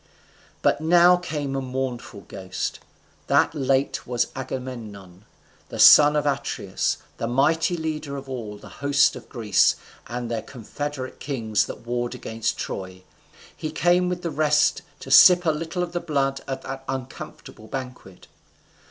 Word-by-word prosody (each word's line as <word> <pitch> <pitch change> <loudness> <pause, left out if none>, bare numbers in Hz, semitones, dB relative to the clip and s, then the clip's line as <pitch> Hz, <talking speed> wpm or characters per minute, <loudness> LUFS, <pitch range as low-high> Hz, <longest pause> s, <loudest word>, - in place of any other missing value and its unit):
But - - +2
now 175 +2 +6
came 150 -6 -4
a 135 - -1
mournful 125 -4 -5
ghost, 95 -1 -5 0.5
that - - +3
late 135 -2 0
was 120 -1 0
Agamemnon, 110 -8 -7 0.5
son 150 0 +8
of 150 - +1
Atreus, 140 -1 -1 0.2
the 115 - -3
mighty 160 +8 +2
leader 155 -3 -4
of 135 0 -8
all 115 -6 -6
the - - -13
host 140 0 +3
of - - -11
Greece 110 -5 +3 0.3
and 120 0 -5
their 115 -1 -2
confederate 130 +3 -6
kings 115 -7 -1
that 120 - -9
warred 120 +1 -2
against 115 -2 -3
Troy. 95 -1 -6 0.5
He 155 - -5
came 180 +2 +2
with 180 0 -4
the 170 - -2
rest 150 0 +2 0.2
to - - -8
sip 180 -1 +8
a 160 - +4
little 165 +3 -3
of 175 - -5
the 175 - -2
blood 140 -5 -1
at 135 -1 -4
that 135 0 -6
uncomfortable 130 -4 -7
banquet. 125 -7 -8
135 Hz, 145 wpm, -24 LUFS, 120-150 Hz, 0.5 s, son